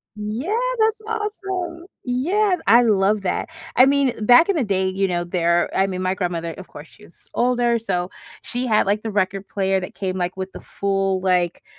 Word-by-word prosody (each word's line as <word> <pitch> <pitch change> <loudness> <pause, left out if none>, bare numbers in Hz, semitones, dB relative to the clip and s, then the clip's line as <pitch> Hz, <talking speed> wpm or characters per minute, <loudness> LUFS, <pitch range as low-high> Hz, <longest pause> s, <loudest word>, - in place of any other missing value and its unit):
Yeah, 225 - -3 0.2
that's 440 0 +2
awesome! 385 -6 -4 0.2
Yeah, 360 +11 +1
I 240 +1 +7
love 205 -1 +2
that. 180 - -2 0.3
I 255 +2 +7
mean, 275 -3 +2
back 245 +9 +7
in 400 - +1
the 290 - +1
day, 190 -2 0
you 195 +1 0
know, 175 -1 -1
there 175 -1 +1
I 195 0 +3
mean, 185 -1 -4
my 185 +1 +1
grandmother, 170 -3 -3
of 185 - -10
course, 145 +2 -11
she 210 - -20
was 170 - -18
older, 240 -1 +1
so 180 -4 -2 0.3
she 245 +1 -2
had, 215 -3 +3
like, 205 +2 0
the 225 - -4
record 195 -1 -1
player 195 -1 0
that 180 - -8
came, 190 -1 -3
like, 180 +1 -3
with 190 0 -5
the - - -9
full, 195 -1 -1
like, 180 -2 0
200 Hz, 200 wpm, -21 LUFS, 185-255 Hz, 0.3 s, I